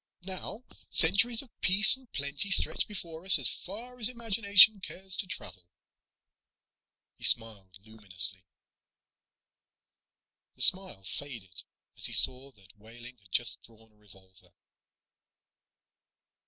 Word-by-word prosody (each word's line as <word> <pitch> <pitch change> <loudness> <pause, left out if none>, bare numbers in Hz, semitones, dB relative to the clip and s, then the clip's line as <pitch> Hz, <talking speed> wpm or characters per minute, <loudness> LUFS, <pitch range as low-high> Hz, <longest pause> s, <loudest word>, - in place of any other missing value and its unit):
Now 195 +5 -7 0.3
centuries 200 +9 +2
of 255 - -19
peace 200 +5 +7
and 260 -3 -17
plenty 140 +7 -5
stretch 195 - -1
before 170 -5 -9
us 190 0 +4
as - - -1
far 240 +6 -9
as 220 - +3
the 250 - -5
imagination 220 -2 +3
cares 190 0 -8
to 195 - -4
travel." 90 - -9 1.5
He - - -18
smiled 100 -5 0
luminously. 95 -4 0 2.1
The - - -1
smile 185 - +4
faded 95 -5 -8 0.3
as - - -4
he - - -1
saw 130 +2 +1
that 100 0 -21
Wehling 120 +3 -15
had 95 -3 -21
just - - -2
drawn 110 -1 -19
a - - -34
revolver. 95 -3 -19
140 Hz, 120 wpm, -27 LUFS, -, 2.1 s, peace